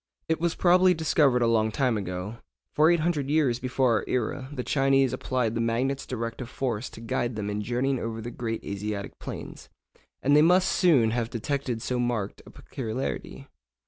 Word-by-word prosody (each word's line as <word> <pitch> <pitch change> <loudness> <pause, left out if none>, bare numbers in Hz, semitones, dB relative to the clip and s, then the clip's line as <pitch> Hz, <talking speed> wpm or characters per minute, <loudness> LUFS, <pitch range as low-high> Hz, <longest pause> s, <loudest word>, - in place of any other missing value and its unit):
It 160 0 0
was 170 -1 0
probably 180 0 +5
discovered 150 -6 +3
a - - +3
long 110 -1 +2
time 125 -1 +1
ago, 95 +2 -4 0.4
for 155 +2 +5
800 160 -4 +1
years 145 -6 +2
before 125 -2 +1
our - - -3
era 130 +2 -2
the 130 -4 -4
Chinese 135 -1 +2
applied 125 -4 -1
the 115 - -1
magnet's 125 +4 -1
directive 115 0 -4
force 120 -6 -3
to 110 - -12
guide 120 +1 -2
them 105 -1 -3
in 105 +1 -2
journeying 125 +4 0
over 115 -1 -4
the 120 +2 -6
great 115 -2 -4
Asiatic 100 0 -5
plains, - - -8 0.5
and 145 +2 +4
they 150 - +7
must 180 +3 +4
soon 140 -12 +4
have 115 -1 -1
detected 125 0 -3
so 125 -1 -1
marked 120 -5 -2
a - - -10
peculiarity. 125 +1 -5
125 Hz, 175 wpm, -27 LUFS, 115-140 Hz, 0.5 s, they